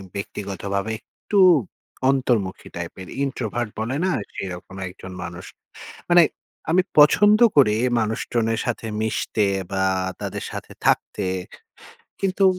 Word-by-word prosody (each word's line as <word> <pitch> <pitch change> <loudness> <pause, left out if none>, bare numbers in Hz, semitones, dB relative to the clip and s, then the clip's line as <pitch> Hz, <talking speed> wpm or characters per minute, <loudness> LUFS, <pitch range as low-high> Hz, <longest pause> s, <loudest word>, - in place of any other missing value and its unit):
ব্যক্তিগতভাবে 100 +1 -3
একটু 200 +9 -3 0.7
অন্তর্মুখী 120 -8 0
টাইপের, 95 -1 -6 0.2
ইন্ট্রোভার্ট 120 -3 -2
বলে 115 +5 -2
না? 190 - +2 0.2
সেরকম 90 -1 -6
একজন 95 0 -10
মানুষ। 85 +1 -7 0.6
মানে 175 0 +7 0.5
আমি 180 +2 +4 0.2
পছন্দ 205 +8 +7 0.2
করি 110 -7 +6 0.2
মানুষজনের 115 +1 -1
সাথে 120 -1 -2 0.2
মিশতে 110 -1 0 0.3
বা 95 0 +1 0.4
তাদের - - -4
সাথে - - -7
থাকতে - - +1 1.0
কিন্তু, 195 0 +1
110 Hz, 105 wpm, -23 LUFS, 100-135 Hz, 1.0 s, মানে